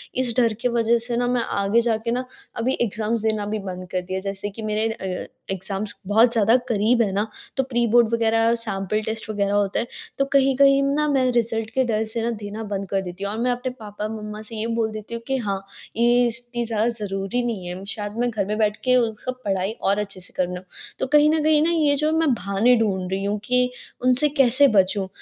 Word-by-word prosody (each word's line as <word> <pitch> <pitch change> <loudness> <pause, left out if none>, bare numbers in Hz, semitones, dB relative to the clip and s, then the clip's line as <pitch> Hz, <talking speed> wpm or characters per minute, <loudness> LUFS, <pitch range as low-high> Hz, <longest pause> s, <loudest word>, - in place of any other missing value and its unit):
इस 250 -2 0
डर 230 -3 +3
के - - +2
वज़ह 235 0 +2
से 240 -1 -1
ना 245 0 +1
मैं 245 -1 +1
आगे 200 +3 +1
जा 230 -2 +1
के 230 - 0
ना 250 +2 -1 0.3
अभी 240 +3 +1
एग्जाम 220 0 0
देना 215 -2 0
भी 215 +1 -2
बंद 185 -2 -6
कर 185 - 0
दिया। 185 +1 -4
जैसे 195 +1 -4
कि 205 +3 -9
मेरे 215 +1 0
अ, 185 -4 -5 0.2
एग्जाम्स 195 +2 -3
बहुत 225 +4 +5
ज़्यादा 225 +1 +4
करीब 230 +2 +2
है 210 -4 +1
ना 205 +3 0 0.3
तो 265 - +3
प्रीबोर्ड 240 -2 +3
वगैरह 225 0 +3
सैंपल 215 -2 -2
टेस्ट 220 0 -2
वग़ैरह 205 -1 0
होता 205 -1 +1
है 235 - -2 0.3
तो 275 - +3
कहीं-कहीं 275 0 +5
ना 290 +2 +1
मैं 270 -3 +2
रिजल्ट 225 -2 0
के 260 +3 +1
डर 220 -2 0
से 230 0 -2
ना 235 - 0
देना 210 +2 -5
बंद 195 -1 -2
कर 195 -1 0
देती 180 +1 -7
हूँ। 200 - -1
और 220 - -4
मैं 250 +1 +1
अपने 245 +1 -2
पापा-मम्मा 210 0 -6
से 220 +1 -7
ये 220 +1 -2
बोल 225 -1 0
देती 215 +1 -8
हूँ 230 - -4
कि 270 0 0
हाँ, 195 -4 -3 0.3
ये 240 +1 +4
इतनी 240 +1 -3
ज़्यादा 225 0 0
ज़रूरी 205 +1 -2
नहीं 210 -7 -3
है 180 +2 -6
शायद 205 0 -5
मैं 245 +1 +1
घर 215 -4 -1
में 210 +2 -2
बैठ 215 -1 +1
के 255 -1 +4
उनका 230 +1 -1
पढ़ाई 195 0 0
और 200 +1 +2
अच्छे 200 -2 -5
से 180 - -9
कर 185 - +2
लूँ। 180 0 -6 0.4
तो - - -1
कहीं 295 +2 +5
न 310 -1 +2
कहीं 310 -1 +4
ना 325 - +2
ये 300 -4 +3
जो 305 +2 +1
मैं 320 -5 +3
बहाने 205 +4 +2
ढूँढ़ 190 -4 0
रही 195 +1 -1
हूँ 205 +1 0
कि 250 +2 +3 0.4
उनसे 255 +4 +3
कैसे 270 +2 +6
बचूँ, 190 +1 +2
225 Hz, 230 wpm, -23 LUFS, 200-245 Hz, 0.4 s, कैसे